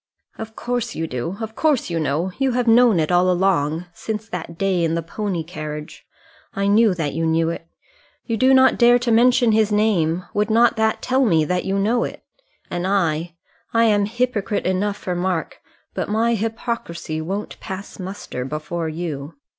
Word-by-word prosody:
"Of 220 Hz, 0 st, -7 dB
course 245 Hz, -1 st, -3 dB
you 165 Hz, -, -2 dB
do; 160 Hz, +6 st, -4 dB
of 220 Hz, 0 st, -5 dB
course 290 Hz, -, +1 dB
you 165 Hz, -, 0 dB
know; 155 Hz, +5 st, -1 dB
you 270 Hz, -2 st, +1 dB
have 245 Hz, 0 st, +1 dB
known 230 Hz, -4 st, +5 dB
it 155 Hz, +2 st, 0 dB
all 180 Hz, +1 st, +4 dB
along: 175 Hz, -3 st, +1 dB
since 220 Hz, +2 st, -5 dB
that 170 Hz, -4 st, -6 dB
day 190 Hz, -2 st, +1 dB
in 165 Hz, 0 st, +1 dB
the 170 Hz, -, -2 dB
pony 185 Hz, 0 st, -3 dB
carriage. 155 Hz, -2 st, -7 dB, 0.5 s
I 200 Hz, -, 0 dB
knew 205 Hz, 0 st, +4 dB
that 155 Hz, -4 st, -2 dB
you 165 Hz, +3 st, -2 dB
knew 165 Hz, +1 st, +2 dB
it. 165 Hz, 0 st, -7 dB, 0.6 s
You 230 Hz, -, -1 dB
do 255 Hz, +4 st, +4 dB
not 260 Hz, 0 st, +5 dB
dare 240 Hz, 0 st, +6 dB
to 240 Hz, -1 st, -1 dB
mention 240 Hz, 0 st, +4 dB
his 215 Hz, -1 st, +2 dB
name: 185 Hz, -5 st, +1 dB
would 210 Hz, +1 st, 0 dB
not 230 Hz, +2 st, +4 dB
that 220 Hz, 0 st, +1 dB
tell 260 Hz, +1 st, +2 dB
me 165 Hz, -9 st, +3 dB
that 180 Hz, +3 st, -1 dB
you 195 Hz, +1 st, 0 dB
know 225 Hz, +5 st, +2 dB
it? -, -, -6 dB, 0.5 s
And 175 Hz, +1 st, -2 dB
I, 170 Hz, -4 st, 0 dB, 0.4 s
I 230 Hz, -, +5 dB
am 205 Hz, -3 st, +3 dB
hypocrite 230 Hz, -3 st, -1 dB
enough 200 Hz, +2 st, 0 dB
for 185 Hz, -, -4 dB
Mark; 175 Hz, -1 st, -2 dB, 0.3 s
but -, -, -3 dB
my 225 Hz, +2 st, +2 dB
hypocrisy 220 Hz, -8 st, -3 dB
won't 195 Hz, +6 st, -5 dB
pass 190 Hz, +2 st, -7 dB
muster 185 Hz, -8 st, -6 dB
before 155 Hz, +4 st, -4 dB
you. 155 Hz, -3 st, -5 dB
195 Hz, 185 wpm, -21 LUFS, 165-225 Hz, 0.6 s, dare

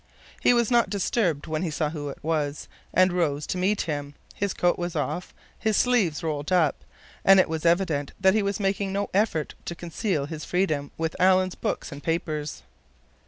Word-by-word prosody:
He -, -, +5 dB
was 235 Hz, -2 st, +2 dB
not 235 Hz, -4 st, +4 dB
disturbed 190 Hz, -5 st, 0 dB
when 155 Hz, 0 st, -2 dB
he 180 Hz, -, -1 dB
saw 150 Hz, 0 st, -1 dB
who 145 Hz, -3 st, -5 dB
it 140 Hz, -, -7 dB
was, 150 Hz, -2 st, -1 dB, 0.2 s
and 185 Hz, 0 st, +4 dB
rose 150 Hz, -5 st, 0 dB
to 180 Hz, -, -3 dB
meet 195 Hz, +3 st, +1 dB
him. 145 Hz, -3 st, -4 dB, 0.2 s
His 200 Hz, -1 st, -1 dB
coat 175 Hz, -1 st, +1 dB
was 175 Hz, -1 st, -3 dB
off, 155 Hz, +4 st, -2 dB, 0.3 s
his 220 Hz, -2 st, +1 dB
sleeves 205 Hz, -, +2 dB
rolled 150 Hz, +1 st, -3 dB
up, 170 Hz, -6 st, +2 dB, 0.4 s
and 195 Hz, 0 st, +7 dB
it -, -, +4 dB
was 160 Hz, +1 st, -1 dB
evident 165 Hz, -5 st, +1 dB, 0.2 s
he 215 Hz, -, +3 dB
was 200 Hz, 0 st, -1 dB
making 195 Hz, 0 st, 0 dB
no 200 Hz, +1 st, -2 dB
effort 190 Hz, -6 st, +1 dB
to 170 Hz, -, -4 dB
conceal 170 Hz, -2 st, -2 dB
his 155 Hz, +1 st, -6 dB
freedom 155 Hz, -6 st, 0 dB
with 160 Hz, 0 st, -2 dB
Alan's 185 Hz, 0 st, +4 dB
books -, -, -3 dB
and 140 Hz, 0 st, -8 dB
papers. 155 Hz, -, -2 dB
170 Hz, 185 wpm, -26 LUFS, 150-195 Hz, 0.4 s, and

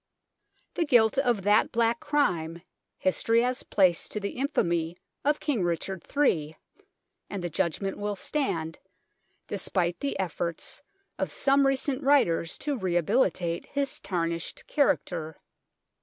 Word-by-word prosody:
The 340 Hz, -, +1 dB
guilt 245 Hz, -4 st, +4 dB
of 240 Hz, -7 st, +1 dB
that 205 Hz, +2 st, +4 dB
black 235 Hz, 0 st, +2 dB
crime 170 Hz, -, 0 dB, 0.3 s
history 225 Hz, +5 st, +2 dB
has 250 Hz, 0 st, -1 dB
placed 185 Hz, -4 st, +2 dB
to 210 Hz, -, -2 dB
the 200 Hz, -1 st, -3 dB
infamy 175 Hz, -, 0 dB, 0.3 s
of 295 Hz, +1 st, +2 dB
King 275 Hz, -9 st, 0 dB
Richard 175 Hz, +1 st, -2 dB, 0.2 s
III, 160 Hz, -, +2 dB, 0.7 s
and 195 Hz, -3 st, -4 dB
the 175 Hz, -, -3 dB
judgment 190 Hz, +4 st, -1 dB
will 205 Hz, 0 st, -2 dB
stand, 170 Hz, -, -2 dB, 0.7 s
despite 175 Hz, -2 st, -1 dB
the 280 Hz, -, -2 dB
efforts 170 Hz, -3 st, -3 dB, 0.4 s
of -, -, 0 dB
some 275 Hz, 0 st, +3 dB
recent 270 Hz, 0 st, 0 dB
writers 250 Hz, -, +3 dB
to 285 Hz, -3 st, -2 dB
rehabilitate 175 Hz, -1 st, +1 dB
his 280 Hz, -1 st, -2 dB
tarnished 170 Hz, -3 st, -3 dB
character. 165 Hz, -, 0 dB
195 Hz, 125 wpm, -28 LUFS, 170-265 Hz, 0.7 s, guilt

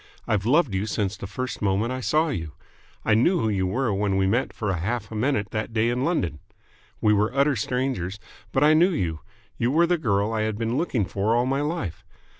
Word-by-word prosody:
I've 105 Hz, 0 st, 0 dB
loved 145 Hz, -, +3 dB
you 95 Hz, +3 st, -1 dB
since 100 Hz, -1 st, -1 dB
the 100 Hz, -, -7 dB
first 130 Hz, +5 st, -5 dB
moment 105 Hz, +4 st, +1 dB
I 130 Hz, -, -3 dB
saw 155 Hz, +5 st, +1 dB
you. 80 Hz, -, -4 dB, 0.5 s
I 110 Hz, -, +3 dB
knew 170 Hz, -, +3 dB
who 110 Hz, -, +1 dB
you 95 Hz, -3 st, 0 dB
were 120 Hz, +3 st, 0 dB
when 100 Hz, -1 st, 0 dB
we 95 Hz, -, +2 dB
met 115 Hz, +7 st, +1 dB
for 105 Hz, -4 st, -2 dB
half 100 Hz, +9 st, -3 dB
a -, -, -6 dB
minute 110 Hz, -3 st, 0 dB
that 110 Hz, +1 st, -3 dB
day 115 Hz, +1 st, +2 dB
in 125 Hz, +2 st, -1 dB
London. 90 Hz, -, -1 dB, 0.6 s
We 105 Hz, -, +4 dB
were 105 Hz, +1 st, +2 dB
utter 140 Hz, +1 st, +3 dB
strangers, 120 Hz, -5 st, -2 dB, 0.3 s
but 135 Hz, -, +2 dB
I 150 Hz, +1 st, +6 dB
knew 170 Hz, +4 st, +5 dB
you. 85 Hz, -, -2 dB, 0.4 s
You 120 Hz, -, +2 dB
were 165 Hz, +6 st, +4 dB
the 175 Hz, 0 st, +1 dB
girl 105 Hz, -5 st, +1 dB
I 110 Hz, -, 0 dB
had 110 Hz, -1 st, -1 dB
been 115 Hz, +1 st, -1 dB
looking 130 Hz, -, 0 dB
for 100 Hz, +4 st, 0 dB
all 120 Hz, +1 st, +2 dB
my 135 Hz, +2 st, 0 dB
life. 145 Hz, -, -3 dB
110 Hz, 225 wpm, -25 LUFS, 100-135 Hz, 0.6 s, I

